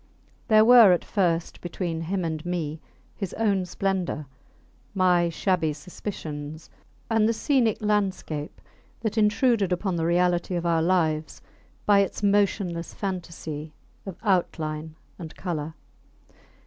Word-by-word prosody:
There 215 -2 +6
were 235 -5 +8
at 175 - -1
first 170 -5 -1
between 175 -1 -3
him 180 +2 -2
and 160 -2 -3
me 165 -3 -3 0.4
his 195 -4 -5
own 200 -5 +1
splendour, 185 -5 -2 0.7
my 180 -2 +3
shabby 165 -2 0
suspicions, 155 -2 -7 0.4
and 225 -1 +3
the - - +2
scenic 235 -3 +1
landscape 190 -7 -1 0.4
that 220 -1 -2
intruded 215 -2 +2
upon 180 0 -1
the 165 - 0
reality 175 +1 +1
of 175 0 -2
our 165 -1 +2
lives 160 -3 0 0.5
by 205 -1 +5
its 200 +1 -1
motionless 195 -4 +1
fantasy 165 -5 -5 0.3
of 190 -3 -8
outline 160 -5 -1 0.2
and 165 -2 -8
colour. 160 -3 -4
180 Hz, 120 wpm, -25 LUFS, 160-200 Hz, 0.7 s, were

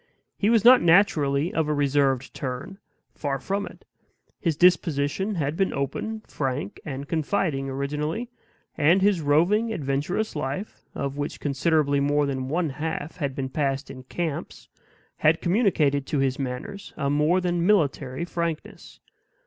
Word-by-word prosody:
He 205 - +1
was 230 -2 +3
not 250 +1 +9
naturally 165 -4 +3
of 160 -2 0
a 150 - +1
reserved 140 -2 +1
turn; 140 +9 -5 0.3
far 140 -2 -2
from 195 +9 -3
it. - - -14 0.5
His 165 -5 0
disposition 180 +2 +2
had 150 -2 -1
been 195 +2 +1
open, 150 - -3
frank, 145 +3 -4
and 140 -2 -6
confiding, 155 -4 -1
originally; 150 - -3 0.4
and 165 +5 +4
his 200 -4 +3
roving, 175 +10 +3
adventurous 155 +5 -2
life, 150 +8 -4
of 140 0 -3
which 145 - -3
considerably 145 0 +1
more 145 +1 +2
than 130 -2 -3
one 165 +2 0
half 155 +2 -4
had 140 -5 -2
been 135 -2 -3
passed 140 0 -2
in 130 - -9
camps, 155 +3 -5 0.5
had 155 +1 +3
communicated 170 - +2
to 150 - -1
his 135 -1 0
manners 135 +10 -5
a 140 -2 0
more 150 +5 +3
than 175 -2 0
military 150 -7 +1
frankness. 170 -2 -5
150 Hz, 145 wpm, -25 LUFS, 140-180 Hz, 0.5 s, not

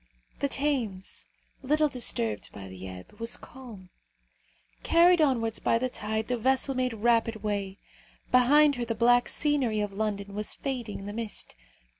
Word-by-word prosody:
The 280 - +1
Thames, 250 -10 -2 0.3
little 300 +3 +2
disturbed 115 - 0
by 100 -2 -9
the 95 0 -9
ebb, 95 - -11
was 230 0 -3
calm. 225 -9 -12 0.9
Carried 345 0 +5
onwards 235 -6 +1
by - - +2
the 255 +2 -1
tide, 220 -1 -3
the 245 -1 -1
vessel 265 +3 +2
made 255 -2 -1
rapid 230 -1 +1
way. 200 -2 -2 0.5
Behind 285 +4 +6
her 240 - -2
the 230 -1 -2
black 245 +2 +4
scenery 275 -8 +1
of 205 -1 -2
London 200 -1 -3
was 210 +1 -2
fading 250 -7 -4
in - - -9
the 205 - -6
mist. 225 -1 -3
230 Hz, 155 wpm, -28 LUFS, 205-260 Hz, 0.9 s, Behind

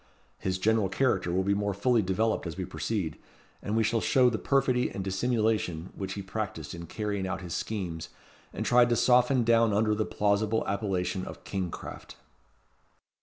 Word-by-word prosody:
His 95 0 -1
general 105 0 +2
character 95 -5 +1
will 95 +2 +1
be 100 +1 +2
more 100 -1 -1
fully 120 +3 +3
developed 105 +1 0
as 85 +1 -6
we 95 - -2
proceed; 90 -5 -3 0.4
and 105 +2 -2
we 115 - +3
shall 110 +1 +1
show 125 -2 +4
the 110 - -2
perfidy 130 -2 +2
and 95 - -5
dissimulation 100 -4 0
which 95 - -4
he 100 - -5
practised 95 -7 -5
in 85 -1 -8
carrying 100 0 -3
out 95 -2 -3
his 90 -3 -6
schemes, 85 -7 -4 0.4
and - - -4
tried 120 0 +5
to 120 - +3
soften 125 +1 +4
down 115 -1 +4
under 105 +1 +2
the 110 +1 0
plausible 105 +2 0
appellation 95 -2 -1
of - - -9
"King 95 -3 -3
craft." - - -9
105 Hz, 175 wpm, -28 LUFS, 95-115 Hz, 0.4 s, tried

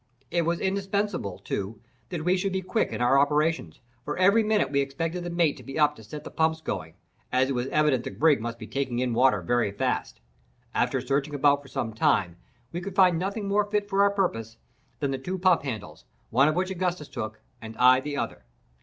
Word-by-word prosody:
It 170 -1 +1
was 170 0 0
indispensable, 195 - -1
too, 100 +2 -4 0.3
that 165 -3 -4
we 180 +1 +4
should 190 +1 -1
be 190 0 -1
quick 220 +5 0
in - - -4
our 130 +3 +4
operations, 150 - +1 0.2
for 150 +3 -4
every 200 +5 +5
minute 215 -8 +1
we 140 -1 +2
expected 165 +6 -3
the 175 - -4
mate 170 -3 +1
to - - -12
be 135 - -7
up 150 -1 +3
to 110 - -13
set 150 +8 -8
the - - -9
pumps 160 0 +1
going, 80 - -5 0.4
as 130 +1 +2
it - - 0
was 125 0 -1
evident 150 -4 +2
the - - -4
brig 150 -6 +3
must 115 0 -4
be - - -8
taking 135 -3 -2
in 125 -1 0
water 120 -5 +3
very 120 +1 +1
fast. 100 - -2 0.5
After - - +1
searching 140 +1 -1
about 145 0 +3
for 140 - -15
some 115 -3 -3
time, 90 -5 +1 0.3
we 175 - -4
could 195 0 -6
find 180 -4 +5
nothing 200 +3 -3
more 205 +1 +2
fit 205 -1 0
for 200 -1 +2
our 200 - +6
purpose 115 - -2 0.4
than 140 -2 0
the 135 - -2
two 185 +8 -4
pump 185 -2 +3
handles, 125 -7 -6 0.3
one 135 +5 +5
of 155 - +1
which 185 +1 0
Augustus 180 -4 -2
took, 110 -4 -6 0.2
and 110 0 -9
I 125 +1 +6
the 145 +1 -4
other. - - -4
150 Hz, 220 wpm, -26 LUFS, 125-180 Hz, 0.5 s, our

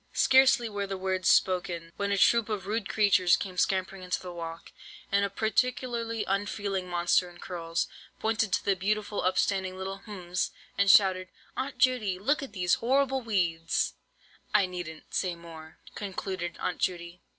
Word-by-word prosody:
"Scarcely 260 -2 +5
were 205 -2 -3
the 195 0 -4
words 185 0 0
spoken, 175 -3 +2
when 200 0 -2
a 200 - +2
troop 230 +3 +4
of 210 -3 -3
rude 210 0 -2
creatures 190 -4 +4
came 190 -2 -6
scampering 190 +1 0
into 180 0 -2
the 180 -1 -8
walk, 165 -1 -7 0.4
and 200 0 +3
a 200 - 0
particularly 230 +1 -1
unfeeling 195 -1 -2
monster 175 +1 +2
in 175 - -15
curls, 170 -2 -3 0.3
pointed 220 -2 0
to - - +1
the 200 - +3
beautiful 205 +2 -1
up 185 0 +1
standing 190 -2 0
little—hms—and 195 0 -3
shouted, 185 -2 +5 0.3
'Aunt 265 0 -4
Judy, 250 -7 +2
look 280 +11 +1
at 275 - -7
these 180 -3 +1
horrible 265 +2 +2
weeds!' 170 -7 0 0.6
"I 205 -2 +6
needn't 175 -4 -8
say 185 -2 0
any - - -9
more," 160 -2 -12 0.2
concluded 185 -3 -4
Aunt 180 - -2
Judy. 175 -1 -3
190 Hz, 160 wpm, -28 LUFS, 180-215 Hz, 0.6 s, I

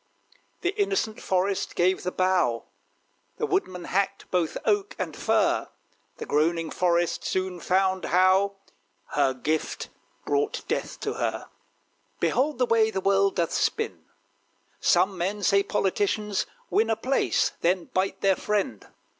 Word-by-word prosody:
The 360 +2 0
innocent 390 - -1
Forest 190 +1 0
gave 185 +2 +2
the 180 - -2
bough. 180 -13 +1 0.7
The 450 - 0
Woodman 280 - -1
hacked 200 +1 -1
both 175 -3 0
oak 410 -1 +1
and - - -4
fir! - - +1 0.5
The - - -6
groaning 165 +2 +1
Forest 175 -1 +1
soon 185 -1 -2
found 190 +1 +1
how 190 +2 +3 0.5
Her 135 -2 +1
gift 155 +4 -2 0.4
brought 425 +1 -1
death - - -3
to - - -2
her. - - -2 0.7
Behold 280 +2 +1
the 250 - +3
way 225 -2 +3
the 205 - -2
world 195 +1 +2
doth 170 -1 0
spin. - - -1 0.7
Some 190 -1 +2
men 200 +4 -2
say, 200 +1 +4
politicians 200 +1 0 0.2
win 225 +1 +2
A 225 - +2
place: 265 +4 +1
then 180 0 0
bite 190 +1 -1
their 195 -1 +4
friend! 200 - -2
190 Hz, 135 wpm, -26 LUFS, 180-210 Hz, 0.7 s, say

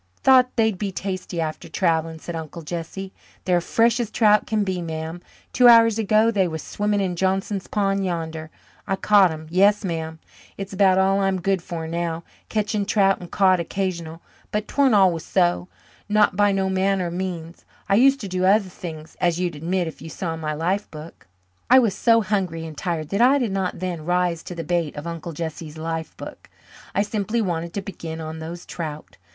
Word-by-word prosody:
"Thought 255 -1 +6
they'd 220 -5 +1
be 200 -2 -2
tasty 185 -2 -4
after 155 -1 -4
travelling," 165 -3 0
said 170 +1 -7
Uncle 160 +1 -7
Jesse. 175 +4 -6 0.3
"They're 180 -2 +2
fresh 230 +6 +2
as 235 -3 -1
trout 210 -2 +3
can 215 -2 +1
be, 185 -2 -2
ma'am. 160 +1 -5 0.3
Two 250 -1 +6
hours 230 -2 +7
ago 215 +1 +3
they 195 -4 +2
was 160 -2 -5
swimming 205 0 -1
in 185 -2 -1
Johnson's 190 +2 -1
pond 195 -1 0
yander. 160 -3 -4 0.4
I 195 - +1
caught 200 -1 +5
'em 160 -1 -7
yes, 200 +3 +4
ma'am. 160 -2 -3 0.4
It's 195 0 -6
about 190 -1 +4
all 195 +1 +3
I'm 195 -1 +1
good 190 0 0
for 170 -2 -5
now, 170 0 -3 0.3
catching 210 -1 0
trout 195 -1 +2
and 175 - -10
cod 185 -2 +3
occasional. 170 -2 -4 0.3
But 210 0 -2
'tweren't 275 -5 +3
always 185 -5 +4
so 175 -1 +1 0.4
not 210 -2 +3
by 205 +1 +3
no 195 -1 0
manner 190 0 +1
of 170 - -4
means. 175 -2 -5 0.2
I 195 - +1
used 270 +6 +5
to 205 - -5
do 185 0 -2
other 195 +1 +4
things, 160 -3 -9
as 175 -1 +2
you'd 175 -3 -1
admit 175 +4 -1
if 160 - -9
you 160 - -8
saw 165 0 -4
my 155 -1 -3
life 185 +6 -1
book." 155 - -11 0.4
I 255 - +8
was 230 -6 +4
so 230 +2 +3
hungry 185 -5 -2
and 160 -1 -8
tired 160 -2 -3
that 200 +3 0
I 260 +4 +6
did 240 -7 -1
not 190 -1 -2
then 175 -3 -4
"rise 175 -1 +1
to 175 - -7
the 165 - -4
bait" 170 -2 -1
of 150 +1 -7
Uncle 170 0 -6
Jesse's 160 0 -6
"life 160 0 -4
book." - - -10 0.5
I 200 - +3
simply 210 +2 -2
wanted 170 -5 -2
to 200 - -3
begin 165 -4 -7
on 160 0 -6
those 170 +2 -7
trout. 155 -3 -7
185 Hz, 195 wpm, -23 LUFS, 165-200 Hz, 0.5 s, I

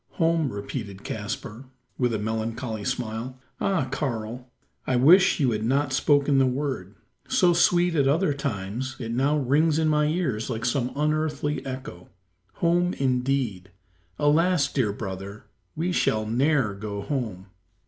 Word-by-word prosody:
"Home!" 165 -4 +1
repeated 100 -1 -6
Caspar, 115 +3 -5 0.3
with 125 -2 +2
a 110 - 0
melancholy 110 +1 -3
smile. 125 0 -3 0.2
"Ah! 190 -9 0
Karl, 125 -3 -4 0.4
I 130 - +1
wish 175 +11 +6
you 135 -5 +3
had 110 -1 -2
not 135 +3 +1
spoken 145 0 +3
the 135 - +4
word. 130 -7 -3 0.3
So 175 -2 +4
sweet 175 0 +3
at 140 -4 +2
other 155 +2 +2
times, 130 -1 -4
it 115 -3 -5
now 135 +5 +2
rings 150 +3 +2
in 160 -1 +2
my 150 0 +3
ears 150 -10 -1
like 115 -1 -3
some 125 0 0
unearthly 150 0 -1
echo. 130 -9 -7 0.4
Home, 175 +1 +1
indeed! 125 -7 -1 0.5
Alas, 150 0 +2
dear 120 -7 +1
brother! 100 0 -7 0.3
we 170 +4 -1
shall 110 -10 +1
ne'er 130 0 +1
go 100 0 -5
home." 110 -10 -3
130 Hz, 140 wpm, -25 LUFS, 110-150 Hz, 0.5 s, wish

